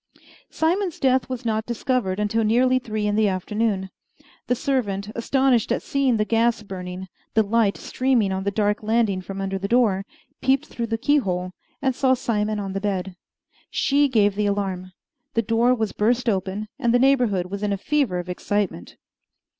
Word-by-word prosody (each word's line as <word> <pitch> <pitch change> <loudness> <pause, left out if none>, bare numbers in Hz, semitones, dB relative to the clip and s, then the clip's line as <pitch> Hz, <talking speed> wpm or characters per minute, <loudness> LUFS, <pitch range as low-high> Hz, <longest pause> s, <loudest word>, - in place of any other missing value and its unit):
Simon's 350 +2 0
death 260 -1 +2
was 255 -1 -5
not 220 -1 -1
discovered 235 -5 -1
until 210 +2 +1
nearly 255 +4 +3
three 215 -4 -3
in 205 0 +1
the 215 0 +3
afternoon. 195 0 -1 0.6
The 250 - +2
servant, 215 -7 -1
astonished 255 0 +2
at - - 0
seeing 270 -4 +1
the 210 - +1
gas 230 0 +1
burning 185 -2 -6 0.3
the 220 - +5
light 215 -1 +1
streaming 250 -6 +1
on 190 0 -2
the 200 - 0
dark 205 0 0
landing 215 -3 +1
from 195 +1 -7
under 195 0 -2
the 200 - -3
door 215 -5 +2 0.4
peeped 270 +3 +2
through 235 -5 -4
the 225 0 -1
keyhole 195 -10 0 0.3
and 265 -1 +2
saw 260 0 +2
Simon 215 -3 -1
on 195 -1 -4
the 195 - -3
bed. 190 -2 -2 0.5
She 285 0 +2
gave 210 -6 +3
the 205 +1 0
alarm. 190 -2 -2 0.4
The 230 - +2
door 230 +3 +3
was 220 -3 -1
burst 240 +3 +1
open, 200 0 -1
and 235 -3 +2
the - - +7
neighborhood 245 -9 +2
was 200 0 -4
in 210 -1 0
a 200 - 0
fever 275 -4 0
of 180 0 -4
excitement. 180 - -2
215 Hz, 180 wpm, -23 LUFS, 195-250 Hz, 0.6 s, the